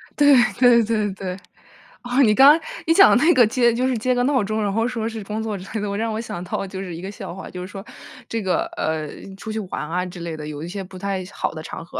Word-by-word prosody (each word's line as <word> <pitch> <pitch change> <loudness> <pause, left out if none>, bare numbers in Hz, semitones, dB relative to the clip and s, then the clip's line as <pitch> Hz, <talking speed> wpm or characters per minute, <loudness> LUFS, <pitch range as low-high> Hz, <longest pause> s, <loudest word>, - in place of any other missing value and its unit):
对 290 -2 +6 0.2
对 245 -2 +6
对 215 -2 0
对。 185 -1 -5 0.6
哦， 245 +3 +2
你 215 -4 +5
刚 280 +7 +8 0.3
你 325 - +5
讲 390 +3 +7
的 245 - +3
那 345 - +6
个 245 -6 +6
接 235 +1 +2
就 250 +2 0
是 260 -2 +1
接 250 +3 0
个 245 - +1
闹 265 -1 +2
钟， 215 +1 -1
然 200 - 0
后 225 +3 0
说 230 -3 -3
是 220 -1 -6
工 215 +2 -3
作 215 -2 -3
之 185 - -10
类 220 - -2
的， 200 -1 -3
让 225 0 -1
我 220 - -3
想 175 -6 -6
到 185 - -3
就 190 0 -7
是 180 -3 -6
一 170 - -8
个 190 +2 -6
笑 195 -4 -8
话。 195 - -8
就 180 - -8
是 180 - -6
说 200 +1 -9 0.4
这 225 -1 -2
个， 185 -2 0
呃， 155 -1 -2 0.3
出 220 +3 -7
去 220 - -3
玩 180 -6 -5
啊 180 +2 -1
之 175 -1 -9
类 170 -2 -5
的， 150 -1 -7
有 150 0 -6
一 - - -5
些 195 +2 -5
不 185 0 -10
太 195 0 -3
好 - - -2
的 155 - -7
场 165 - -8
合， - - -7
210 Hz, 300 characters per minute, -22 LUFS, 185-235 Hz, 0.6 s, 刚